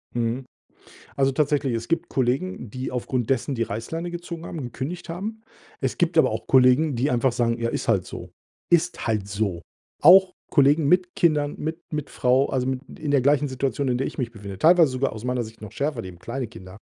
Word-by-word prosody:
Mhm. 120 +2 -1 0.7
Also, 135 0 +2
tatsächlich, 140 -3 +1
es 115 0 -4
gibt 165 - 0
Kollegen, 130 - -1
die 130 +4 -5
aufgrund 125 -1 -2
dessen 135 +1 0
die 115 - -1
Reißleine 160 +12 -4
gezogen 170 -1 -7
haben, 165 - -6
gekündigt 135 +9 -6
haben. 210 +6 -5 0.4
Es 130 -2 -2
gibt 170 -1 +1
aber - - +5
auch 110 +1 -4
Kollegen, 130 +3 +4
die 130 +5 0
einfach 125 +1 +2
sagen: 120 -1 0
„Ja, 115 0 -1
ist - - -4
halt 100 -6 +2
so.“ - - -8 0.4
Ist 175 -3 +2
halt 105 -3 0
so. 100 -4 -2 0.4
Auch 185 +3 +7 0.2
Kollegen 145 +1 +4
mit 180 +2 +2
Kindern, 150 -3 +1
mit 160 +2 -4
mit 150 -2 -3
Frau, 130 +2 +2
also, 130 -1 -1
mit 130 -1 -1 0.2
in 150 -2 -2
der 140 - +4
gleichen 145 +2 +2
Situation, 135 +1 -1
in 125 -1 +1
der 135 - -1
ich - - -7
mich 120 -3 -2
befinde, 100 -4 -9
teilweise 165 - +6
sogar 130 0 -1
aus 110 +2 -8
meiner 125 -1 0
Sicht 110 0 -11
noch 105 -1 -9
schärfer, 140 -3 -2
die 95 - -7
haben 90 -1 -12
kleine 125 +6 -4
Kinder. 95 -3 -12
130 Hz, 210 wpm, -24 LUFS, 115-155 Hz, 0.7 s, Auch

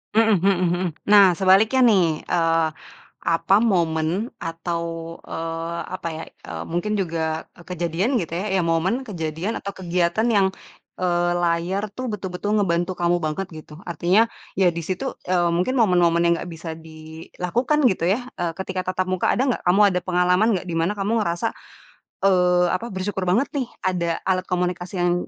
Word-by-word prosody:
Mhm 220 -1 +5
mhm 195 +1 +3 0.2
mhm. 175 +1 -1 0.2
Nah, 205 -1 +7
sebaliknya, 200 +7 +4
nih, 210 -5 +5 0.2
eee, 165 -1 +2 0.6
apa, 165 +3 +3
momen 165 -8 +1 0.3
atau, 170 0 -3 0.4
eee, 165 +1 -4
apa 185 - -4
ya, - - -6 0.3
eee, - - -5
mungkin 175 +5 -1
juga 165 -4 -2 0.2
kejadian 180 - 0
gitu 170 -6 -3
ya, 180 +4 -2
ya 190 - +3
momen, 180 +10 0
kejadian 170 0 -3
atau 200 - -5
kegiatan 180 +3 0
yang, 195 -1 +4 0.5
eee, 175 -1 +1
layar 175 +3 0
tuh 255 +4 -5
betul-betul 205 0 -2
ngebantu 175 -2 +1
kamu 175 0 +2
banget 155 +5 -2
gitu, 155 -1 -12
artinya 180 +5 +3 0.3
ya 190 - +4
di - - -2
situ, 185 -1 -3 0.2
eee, 175 -2 +2
mungkin 185 +10 0
momen-momen 175 -6 +3
yang 170 - +4
enggak 175 - -6
bisa 165 +1 -7 0.2
dilakukan, 165 - -3
gitu 180 - -4
ya, 235 +6 0
eee, 175 -1 0
ketika 190 -1 -3
tatap 185 0 -1
muka 185 - 0
ada - - +2
enggak? 255 - 0
Kamu 185 +4 +5
ada 180 - +1
pengalaman 180 +3 +2
enggak? 180 - -7
Di - - -3
mana 170 +5 +1
kamu 200 +2 -1
ngerasa, 175 +3 -1 0.8
eee, 180 -2 +4
apa, 185 +5 -2
bersyukur 190 0 -3
banget, 230 +10 +2
nih, 260 -3 -1 0.2
ada 180 -2 0 0.2
alat 185 -1 +1
komunikasi 180 0 -2
yang 175 0 +3
180 Hz, 165 wpm, -23 LUFS, 170-195 Hz, 0.8 s, Nah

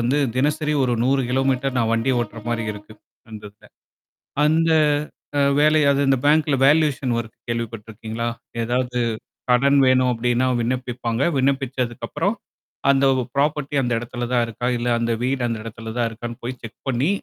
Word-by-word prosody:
வந்து 125 +5 +1 0.2
தினசரி 150 +3 +1
ஒரு 125 - 0
100 135 +2 +2 0.3
மீட்டர் 130 +1 0
கிலோ - - -4
நான் 115 -1 +1
வண்டி 115 +3 +1
ஓட்டுற 115 -1 -5
மாரி 115 -1 -1
இருக்கு. 105 +1 -12 0.4
அந்த 110 -1 -9
இதுல. 105 - -21 0.8
அந்த 165 +2 +3 0.7
அ - - +3 0.2
வேலைய 155 0 +4 0.2
அந்த 135 0 +4
பேங்கல 150 -1 +3
வேலுயேசன் 145 -4 +3
வொர்க்கு 115 -1 -6
கேள்விப்பட்டிருக்கீங்களா? 115 0 -4 0.3
ஏதாவது 125 +1 -1 0.5
கடன் 140 +3 +4
வேணும் 130 0 +4
அப்டீன்னா, 120 +2 +1
விண்ணப்பிப்பாங்க. 120 -1 -2 0.2
விண்ணப்பிச்சதுக்கு 130 -3 -1
அப்புறம், 175 +8 -1 0.6
அந்த 140 0 +4 0.3
ப்ராபர்ட்டி 145 0 0
அந்த 120 -2 -1
இடத்துல 120 +1 -5
தான் 120 -1 +3
இருக்கா? 115 +2 -4
இல்ல 120 - -3
அந்த 115 0 0
வீடு 130 -1 0
அந்த 115 -2 -3
இடத்துல 115 0 -7
தான் 120 -1 +1
இருக்கான்னு? 115 +1 -7
போய் 125 +1 -5
செக் 115 -1 -10
பண்ணி 130 +5 +1
125 Hz, 155 wpm, -22 LUFS, 115-135 Hz, 0.8 s, வேலைய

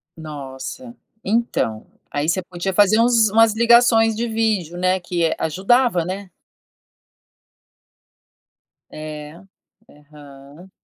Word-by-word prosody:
Nossa, 150 - -9 0.3
então, 200 - -1 0.3
aí 145 +2 -2
você 185 +2 0
podia 180 +1 -5
fazer 205 +3 +4
uns 230 -2 +4
umas 225 0 +4
ligações 230 -1 +4
de 235 +2 -2
vídeo, 215 -7 -1
né, 185 +1 +1
que 175 -1 -3
,eh, 160 - 0
ajudava, 190 - +1
né? 190 +1 -6 2.6
É, 155 +1 -9 0.5
aham. 145 +2 -16
185 Hz, 100 wpm, -20 LUFS, 155-225 Hz, 2.6 s, fazer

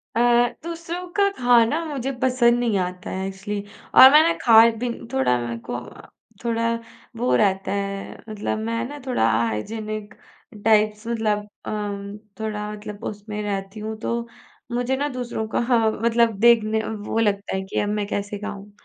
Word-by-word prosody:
अ, - - +1 0.4
दूसरों 335 +2 -5
का 400 0 +5
खाना 245 +5 +4
मुझे 275 -4 -3
पसंद 240 -2 +3
नहीं 230 -4 +1
आता 180 0 -4
है 190 0 -3
एक्चुअली 200 +1 -5 0.3
और 260 - +12
मैंने 315 +3 +6
खाए 230 0 +7
भी 245 - 0 0.2
थोड़ा 265 - +2
मेरे 120 -1 -4
को 115 +1 -6
अ, 120 - -11 0.4
थोड़ा 230 0 0 0.4
वो 245 +2 +2
रहता 195 -2 +1
है 200 0 -3 0.2
मतलब 215 0 -3
मैं 230 0 -1
ना 290 0 -8
थोड़ा 245 - +2
हाइजीनिक 210 - -2 0.5
टाइप्स 215 0 +3
मतलब 215 -3 -1 0.2
अम, 205 -1 -4 0.2
थोड़ा 210 -1 -3
मतलब 210 0 -8
उसमें 210 0 -5
रहती 195 0 -4
हूँ, 220 +1 -4
तो 235 +1 -2 0.4
मुझे 245 +2 0
ना 285 +2 0
दूसरों 245 -4 -4
का - - -1
हाँ, 235 -2 +2
मतलब 230 -2 +3
देखने 220 -1 +4
वो 215 0 -4
लगता 205 -3 0
है 190 - -1
कि 190 - -3
अब 205 - 0
मैं 210 0 -1
कैसे 205 0 -3
खाऊँ? 205 -1 -7
215 Hz, 160 wpm, -23 LUFS, 205-235 Hz, 0.5 s, और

